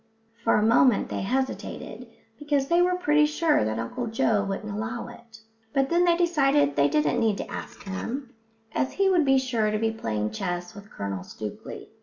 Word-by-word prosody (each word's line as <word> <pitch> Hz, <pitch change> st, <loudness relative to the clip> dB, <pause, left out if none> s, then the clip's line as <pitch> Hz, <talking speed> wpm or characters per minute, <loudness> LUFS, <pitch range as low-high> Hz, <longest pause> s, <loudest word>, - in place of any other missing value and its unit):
For 230 Hz, -, +3 dB
a 210 Hz, -, +3 dB
moment 235 Hz, 0 st, +4 dB
they -, -, -3 dB
hesitated 260 Hz, +6 st, -3 dB, 0.3 s
because 290 Hz, -2 st, 0 dB
they 340 Hz, +1 st, +4 dB
were 360 Hz, 0 st, +3 dB
pretty 300 Hz, -4 st, +3 dB
sure 310 Hz, -, +2 dB
that 110 Hz, +1 st, -2 dB
Uncle 115 Hz, -, -4 dB
Joe 220 Hz, -2 st, +1 dB
wouldn't 200 Hz, +1 st, -4 dB
allow 225 Hz, +3 st, -4 dB
it; 235 Hz, -2 st, -14 dB, 0.3 s
but 270 Hz, 0 st, +2 dB
then 350 Hz, +1 st, +4 dB
they 340 Hz, -1 st, +4 dB
decided 275 Hz, -, +2 dB
that 140 Hz, 0 st, +3 dB
they 150 Hz, -1 st, +2 dB
needn't 225 Hz, -4 st, 0 dB
ask -, -, -8 dB
him, 235 Hz, +7 st, -5 dB, 0.4 s
as 265 Hz, -, -1 dB
he 390 Hz, -1 st, +2 dB
would 345 Hz, -5 st, +3 dB
be 270 Hz, -1 st, +4 dB
sure 240 Hz, -5 st, 0 dB
to 215 Hz, -, 0 dB
be 225 Hz, +1 st, 0 dB
playing 105 Hz, -, -3 dB
chess 175 Hz, -, -4 dB
with 200 Hz, +1 st, -12 dB
Colonel 100 Hz, -2 st, -5 dB
Stookley. 105 Hz, +2 st, -8 dB
230 Hz, 185 wpm, -26 LUFS, 195-280 Hz, 0.4 s, moment